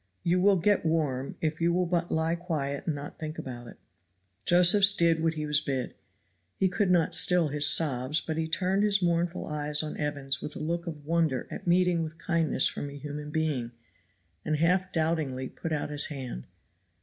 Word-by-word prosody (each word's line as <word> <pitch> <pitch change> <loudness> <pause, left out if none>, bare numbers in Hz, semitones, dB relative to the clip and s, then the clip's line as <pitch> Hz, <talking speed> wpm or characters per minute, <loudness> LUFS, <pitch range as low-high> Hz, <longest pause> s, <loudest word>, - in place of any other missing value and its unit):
"You 180 +1 +2
will 200 +1 +5
get 200 +3 +2
warm, 150 -5 -1
if 155 0 -2
you 170 +1 +3
will 180 +1 +1
but 175 0 -1
lie 160 +1 0
quiet 155 -5 -3
and 160 - 0
not 145 +1 -8
think 155 0 -5
about 120 -2 -7
it." - - -12 0.7
Josephs 195 +3 +6
did 165 -2 +3
what 165 0 +1
he 155 -1 -3
was 150 0 +2
bid. 135 -4 -3 0.6
He 190 - +2
could 195 +1 0
not 175 -3 +3
still 175 -4 +3
his 145 0 +2
sobs, 145 -2 +2
but 160 - -4
he 160 0 -1
turned 185 +4 0
his 200 -2 +2
mournful 170 0 0
eyes 150 0 -2
on 155 - -5
Evans 140 -2 -2
with 150 - -7
a - - -6
look 170 +3 -3
of 150 -3 -7
wonder 160 -5 0
at - - -7
meeting 175 -1 +3
with 160 0 -5
kindness 165 -6 +1
from 145 - -5
a 140 - -9
human 150 +1 -6
being, 150 -6 -2 0.7
and 155 - 0
half 180 +3 +1
doubtingly 155 -6 -1
put 165 - -6
out 150 -1 -2
his 145 0 +2
hand. 130 - -6
160 Hz, 195 wpm, -28 LUFS, 145-170 Hz, 0.7 s, Josephs